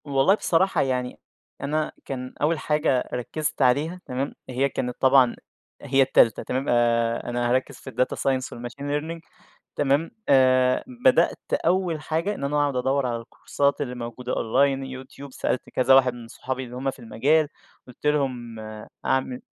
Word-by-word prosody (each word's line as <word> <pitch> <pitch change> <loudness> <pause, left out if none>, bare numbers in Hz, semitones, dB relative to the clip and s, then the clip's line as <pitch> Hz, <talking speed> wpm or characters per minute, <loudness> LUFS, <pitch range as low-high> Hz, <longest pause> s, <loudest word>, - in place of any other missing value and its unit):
والله 140 +7 +3
بصراحة، 190 -1 +2
يعني 125 -2 -2 0.4
أنا 155 +2 -1
كان 130 -1 -5
أول 155 +2 +2
حاجة 150 -4 +1
ركزت 150 +5 -3
عليها 150 +8 +2
تمام، 130 +2 -3 0.2
هي 130 +2 +1
كانت 125 -2 -3
طبعًا 130 -2 +5 0.5
هي 135 -1 +2
التالتة 130 -4 +4
تمام، 130 +2 -2
آآ 115 -1 +2
أنا 120 0 -1
هاركِّز 130 +2 0
في - - -10
الData 125 +2 0
Science 130 -1 0
والMachine 120 +3 -8
Learning 150 +4 -3 0.6
تمام، 145 - +1 0.2
آآ 130 -1 +4 0.2
بدأت 260 -1 +4 0.3
أول 180 -4 +1
حاجة 165 +7 -1
إن - - -7
أنا 140 +2 -1
أقعُد 145 -2 +1
أدور 135 +2 +1
على 120 -2 -1
الكورسات 140 +5 -1
اللي 125 -3 -3
موجودة 120 +1 -5
Online 135 +3 +1
يوتيوب، 130 +1 -10
سألت 125 - -2
كذا 130 +1 +3
واحد 130 -2 +4
من 120 -1 -10
صحابي 130 +2 -5
اللي 125 -1 -9
هُم 135 +2 -1
في - - -16
المجال، 140 +7 +2 0.4
قُلت 125 +3 -14
لهم 125 -6 -1 0.5
أعمل 130 -1 0
130 Hz, 155 wpm, -24 LUFS, 125-145 Hz, 0.6 s, طبعًا